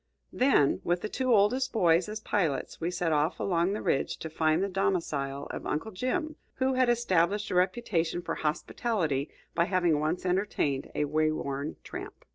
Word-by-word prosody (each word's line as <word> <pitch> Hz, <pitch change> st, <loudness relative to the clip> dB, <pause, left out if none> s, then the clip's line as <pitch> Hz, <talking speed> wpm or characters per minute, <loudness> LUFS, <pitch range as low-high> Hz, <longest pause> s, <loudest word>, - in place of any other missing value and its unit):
Then, 250 Hz, -, +3 dB
with 175 Hz, +1 st, 0 dB
the 215 Hz, -, -3 dB
two 255 Hz, +2 st, -1 dB
oldest 230 Hz, +5 st, +3 dB
boys 175 Hz, -3 st, +3 dB
as 215 Hz, +1 st, -4 dB
pilots, 170 Hz, -12 st, -1 dB
we 165 Hz, -, 0 dB
set 175 Hz, -2 st, -1 dB
off 155 Hz, +3 st, +1 dB
along 175 Hz, 0 st, +1 dB
the 210 Hz, -, -4 dB
ridge 135 Hz, -, 0 dB
to 160 Hz, -, -7 dB
find 160 Hz, +2 st, +2 dB
the -, -, +1 dB
domicile 165 Hz, -8 st, -1 dB
of -, -, -6 dB
Uncle 155 Hz, +9 st, -2 dB
Jim, 310 Hz, -, -2 dB, 0.2 s
who 265 Hz, 0 st, +1 dB
had 255 Hz, -1 st, +3 dB
established 210 Hz, -3 st, +1 dB
a -, -, -1 dB
reputation 180 Hz, -3 st, 0 dB
for -, -, -2 dB
hospitality 155 Hz, -, -1 dB, 0.2 s
by 170 Hz, -, +2 dB
having 175 Hz, -4 st, +2 dB
once 155 Hz, +5 st, -1 dB
entertained 180 Hz, -7 st, 0 dB
a 150 Hz, -, +1 dB
way 155 Hz, +1 st, +1 dB
worn 140 Hz, -1 st, -3 dB
tramp. -, -, -8 dB
175 Hz, 175 wpm, -29 LUFS, 155-210 Hz, 0.2 s, Then